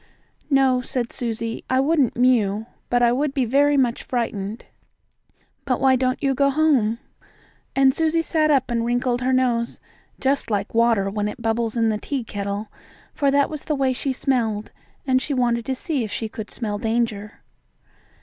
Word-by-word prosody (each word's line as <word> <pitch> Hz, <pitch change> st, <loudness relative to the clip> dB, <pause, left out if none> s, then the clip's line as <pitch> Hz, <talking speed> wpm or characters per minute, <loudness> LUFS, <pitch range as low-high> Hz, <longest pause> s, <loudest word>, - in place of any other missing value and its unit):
"No," 265 Hz, -3 st, +3 dB
said 245 Hz, -1 st, -3 dB
Susie, 230 Hz, -2 st, -3 dB
"I 260 Hz, -, +2 dB
wouldn't 280 Hz, -2 st, +2 dB
mew, 225 Hz, -4 st, +2 dB, 0.2 s
but 245 Hz, 0 st, +2 dB
I 235 Hz, -, +5 dB
would 275 Hz, +3 st, -1 dB
be 265 Hz, -3 st, +2 dB
very 285 Hz, +4 st, +3 dB
much 250 Hz, -3 st, +1 dB
frightened. 220 Hz, -3 st, -3 dB, 1.0 s
But 255 Hz, -3 st, 0 dB
why 265 Hz, -1 st, +4 dB
don't 255 Hz, +1 st, -1 dB
you 275 Hz, -1 st, +2 dB
go 280 Hz, +1 st, +2 dB
home?" 275 Hz, -7 st, +2 dB, 0.8 s
And 270 Hz, -1 st, +5 dB
Susie 325 Hz, +2 st, +1 dB
sat 315 Hz, -2 st, +1 dB
up 270 Hz, -4 st, +2 dB
and 235 Hz, -1 st, 0 dB
wrinkled 245 Hz, +1 st, 0 dB
her 255 Hz, +1 st, +1 dB
nose, 245 Hz, -2 st, +1 dB, 0.4 s
just 270 Hz, -2 st, 0 dB
like 205 Hz, -1 st, -2 dB
water 230 Hz, -4 st, +3 dB
when 210 Hz, 0 st, -1 dB
it 210 Hz, -, -6 dB
bubbles 225 Hz, 0 st, -1 dB
in 225 Hz, -1 st, +3 dB
the 215 Hz, -1 st, -1 dB
tea 270 Hz, +2 st, -3 dB
kettle, 205 Hz, 0 st, -4 dB, 0.4 s
for 280 Hz, -, +1 dB
that 280 Hz, 0 st, +3 dB
was 305 Hz, -3 st, -7 dB
the 305 Hz, -, 0 dB
way 265 Hz, -2 st, +1 dB
she 270 Hz, +2 st, -2 dB
smelled, 230 Hz, -5 st, -1 dB, 0.3 s
and 260 Hz, -1 st, +2 dB
she 285 Hz, -, -2 dB
wanted 235 Hz, -2 st, 0 dB
to 265 Hz, -, -1 dB
see 280 Hz, -1 st, -2 dB
if 215 Hz, -, -5 dB
she 225 Hz, -, -3 dB
could 215 Hz, 0 st, -8 dB
smell 210 Hz, -3 st, -4 dB
danger. 220 Hz, -2 st, -2 dB
245 Hz, 180 wpm, -22 LUFS, 225-270 Hz, 1.0 s, I